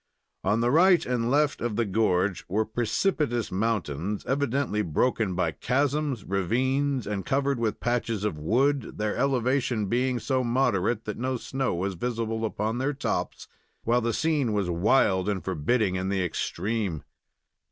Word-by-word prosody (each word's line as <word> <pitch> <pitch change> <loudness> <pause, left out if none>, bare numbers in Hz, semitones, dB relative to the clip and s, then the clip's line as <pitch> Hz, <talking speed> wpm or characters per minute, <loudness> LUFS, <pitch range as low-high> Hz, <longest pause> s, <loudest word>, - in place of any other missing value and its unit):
On 110 +3 +2
the 120 +1 +2
right 175 +4 +5
and 120 -2 0
left 145 +2 +2
of 120 -3 -1
the 115 - +1
gorge 95 -2 +1
were 110 +4 +1
precipitous 120 - 0
mountains, 100 -3 -2
evidently 135 -4 0
broken 105 +3 0
by 90 -3 +1
chasms, 140 - 0
ravines, 130 +7 0
and 100 -2 -3
covered 140 +3 0
with 110 -3 -1
patches 115 -3 -1
of 105 -6 -1
wood, 125 - 0
their 105 0 -1
elevation 130 -4 +1
being 125 +4 0
so 130 +1 0
moderate 120 -3 +1
that 105 - -5
no 130 +1 -1
snow 135 -2 -2
was 95 +3 -2
visible 115 +2 -2
upon 110 +2 -2
their 140 +3 0
tops, 140 - -3 0.4
while 120 +2 +2
the 115 0 0
scene 145 -4 +1
was 100 -4 0
wild 95 +1 +2
and 100 -3 -2
forbidding 95 +3 +1
in 95 +1 -2
the 95 -1 0
extreme. 95 0 -2
115 Hz, 150 wpm, -27 LUFS, 100-130 Hz, 0.4 s, right